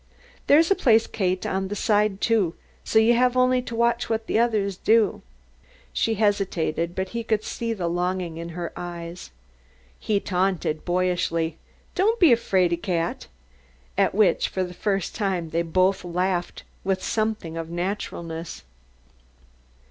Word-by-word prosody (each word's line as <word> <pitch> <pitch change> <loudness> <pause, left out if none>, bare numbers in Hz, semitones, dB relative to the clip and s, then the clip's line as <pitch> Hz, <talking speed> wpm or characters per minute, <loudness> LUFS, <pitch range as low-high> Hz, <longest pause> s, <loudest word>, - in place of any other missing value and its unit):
"There's 320 +5 +5
a - - +6
place, 225 -7 +4
Kate 185 -2 -1
on 190 0 -1
the 205 - -4
side, 210 -1 +1
too, 205 -8 +2 0.3
so - - 0
you 220 +2 +6
have 250 +1 +2
only 255 0 +3
to 235 -2 -7
watch 235 0 +1
what 225 0 -1
the 225 - +1
others 215 -5 +1
do." 220 +2 +2 0.7
She 225 - +1
hesitated, 185 -5 0
but 190 0 -2
he 235 0 -4
could 220 -1 0
see 230 -1 -3
the 190 -6 -2
longing 175 -1 -2
in 170 0 -6
her 175 -1 -4
eyes. 170 - -7 0.7
He 210 -2 0
taunted 180 -5 -1
boyishly, 175 -3 0 0.3
"Don't 440 +5 +2
be 340 -7 +6
a - - +7
'fraidy 185 -6 +1
cat,'" 170 -3 -2 0.7
at - - +2
which 200 -5 +3
for 185 - -1
the 180 -1 -6
first 195 0 -1
time 185 -6 -2
they 170 - +1
both 185 +3 +1
laughed 180 0 -2 0.2
with 190 -1 -1
something 215 -7 -2
of 165 0 -5
naturalness. 170 -2 -4
190 Hz, 150 wpm, -24 LUFS, 175-220 Hz, 0.7 s, a